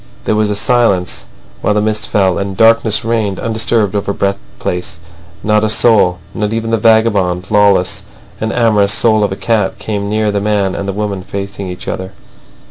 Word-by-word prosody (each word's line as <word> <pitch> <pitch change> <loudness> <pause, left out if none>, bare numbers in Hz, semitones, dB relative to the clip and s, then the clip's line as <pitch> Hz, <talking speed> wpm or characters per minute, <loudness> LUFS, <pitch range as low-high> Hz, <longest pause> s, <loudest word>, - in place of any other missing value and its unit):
There - - +1
was 105 0 +1
a 105 - -1
silence, 105 -6 +1 0.3
while 105 - +1
the - - +3
mist 110 0 -1
fell, 95 -3 +1
and 100 -1 -4
darkness 115 -1 +3
reigned 110 -4 -1
undisturbed 110 -2 0
over 100 -1 -1
Brett 100 0 -1 0.2
Place. 90 -1 -4 0.4
Not 105 0 +2
a 110 - +1
soul, 105 -5 +4 0.2
not 105 0 -2
even 115 0 -2
the 115 - +1
vagabond, 105 -5 +2
lawless, 100 -3 +3 0.4
and 110 0 -2
amorous 105 -4 +3
soul 110 -2 +3
of 100 - 0
a - - -2
cat, 105 -2 0
came 100 -2 -3
near 105 0 0
the 100 0 -1
man 100 -2 0
and 100 - -4
the - - 0
woman 100 -1 -3
facing 100 0 -6
each 90 0 -8
other. 95 +1 -5
105 Hz, 185 wpm, -14 LUFS, 100-110 Hz, 0.4 s, soul